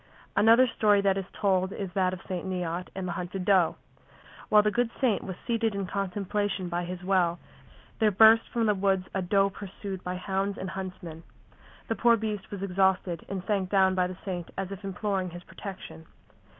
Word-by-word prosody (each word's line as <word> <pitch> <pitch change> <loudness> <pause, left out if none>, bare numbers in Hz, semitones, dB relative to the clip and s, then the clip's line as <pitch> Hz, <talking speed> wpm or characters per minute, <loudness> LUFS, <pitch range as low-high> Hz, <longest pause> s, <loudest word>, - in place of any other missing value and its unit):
Another 230 +4 +6
story 210 -4 +3
that 195 -1 +2
is 195 -1 -3
told 190 -2 +1
is 195 -2 -5
that 185 -1 +2
of 185 -1 -7
St. 180 -2 -3
Neot 180 -1 -3
and 190 -1 -3
the - - -2
hunted 180 +1 -4
doe. 185 -4 +4 0.7
While 210 0 +6
the 210 - +2
good 240 +2 +1
saint 245 -7 +2
was 190 - -5
seated 230 -3 0
in 200 -1 -2
contemplation 195 0 -2
by 175 +1 -2
his 180 +1 -6
well, 180 -2 +2 0.6
there 220 - +4
burst 220 +3 +6
from 235 -1 0
the 210 - +4
woods 190 -1 +1
a 195 - 0
doe 195 +2 +2
pursued 195 -1 -7
by 180 0 -3
hounds 195 +2 -2
and 185 0 -5
huntsmen. 180 -4 -7 0.7
The - - 0
poor 235 0 +4
beast 210 -2 -4
was 200 -1 -6
exhausted 190 -2 +1
and 190 -2 -4
sank 195 -3 0
down 190 -1 +4
by 180 -1 +1
the 180 0 -8
saint 180 -3 -4
as 195 0 -3
if 195 +1 -7
imploring 195 -1 -2
his 175 +1 -10
protection. 180 - -9
190 Hz, 190 wpm, -28 LUFS, 180-205 Hz, 0.7 s, Another